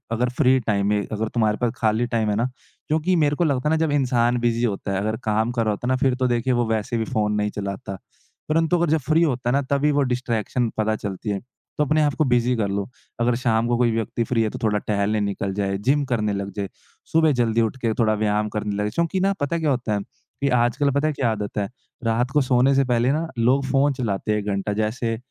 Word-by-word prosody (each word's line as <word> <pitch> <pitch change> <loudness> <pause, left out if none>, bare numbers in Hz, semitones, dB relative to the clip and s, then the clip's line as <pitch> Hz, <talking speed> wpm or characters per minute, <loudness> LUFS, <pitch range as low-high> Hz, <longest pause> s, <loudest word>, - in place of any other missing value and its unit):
अगर 125 +2 0
free 130 -2 +4
time 100 -3 0
है 105 -1 +1
अगर 110 +1 -1
तुम्हारे 110 -2 +2
पास 120 -2 +1
खाली 110 +1 +1
टाइम 115 -2 0
है 105 - +1
ना 120 +4 0 0.4
जो 155 - +3
कि 185 +4 +1
मेरे 150 -3 +2
को 175 - +1
लगता 140 -2 +1
है - - +1
ना - - +2
जब 155 - -1
इंसान 125 -4 +2
बिज़ी 120 0 0
होता 100 -3 -1
है 95 - 0
अगर 110 +2 -1
काम 110 +2 +1
कर 120 -2 0
रहा 110 - +2
होता 105 +4 -4
है - - 0
ना - - +1
फ़िर 130 -1 +2
तो 130 0 0
देखिए 120 +1 +1
वो 120 -1 +1
वैसे 110 +1 -1
भी 110 - -1
फ़ोन 105 -3 0
नहीं 105 0 0
चलाता। 100 -1 -5 0.5
परंतु 165 +2 +2
अगर 170 -2 +1
जब 160 - +3
फ्री 160 +2 +4
होता 125 -6 0
है - - +2
ना 140 - +3
तभी 140 +1 +3
वो 145 0 +2
डिस्ट्रैक्शन 125 -1 -1
पता 110 0 +1
चलती 100 +1 -5
है, 100 -1 -1 0.4
तो 150 - +3
अपने 155 +2 +2
आप 145 -1 +1
को 155 - +2
बिज़ी 125 -1 +2
कर 105 -3 0
लो। 100 0 -2 0.3
अगर 120 0 +2
शाम 115 -2 +1
को 120 0 +1
कोई 120 -1 +3
व्यक्ति 115 +1 -1
फ्री 115 0 0
है 110 - 0
तो 125 - -7
थोड़ा 105 -1 +2
टहलने 105 +1 0
निकल 100 -1 -2
जाए, 100 -1 -1
जिम 135 +8 +1
करने 110 -5 0
लग 100 0 -4
जाए, 100 -2 -4 0.4
सुबह 160 -1 +4
जल्दी 115 -2 +1
उठ 115 +3 -1
के 115 -2 +1
थोड़ा 110 -2 +3
व्यायाम 105 0 0
करने 105 -1 -3
लगे, 105 +1 -1
चूँकि 170 - -1
ना 195 +1 +2
पता 145 +4 0
क्या 160 -2 0
होता 120 -4 -1
है 105 - 0
कि 140 +6 -6
आजकल 125 +4 +2
पता 140 +3 +1
है 155 - 0
क्या 130 -5 0
आदत 105 -1 -4
है 100 -1 0 0.4
रात 120 +3 0
को 150 - +3
सोने 130 +1 +3
से 135 - +4
पहले 125 +1 +2
ना 160 +2 -1
लोग 130 +4 +3
फ़ोन 140 +1 +2
चलाते 110 -5 -2
हैं 105 - +1
1 100 - -6
घंटा 100 0 -1
जैसे, 110 +2 -1
120 Hz, 260 wpm, -23 LUFS, 105-135 Hz, 0.5 s, फ्री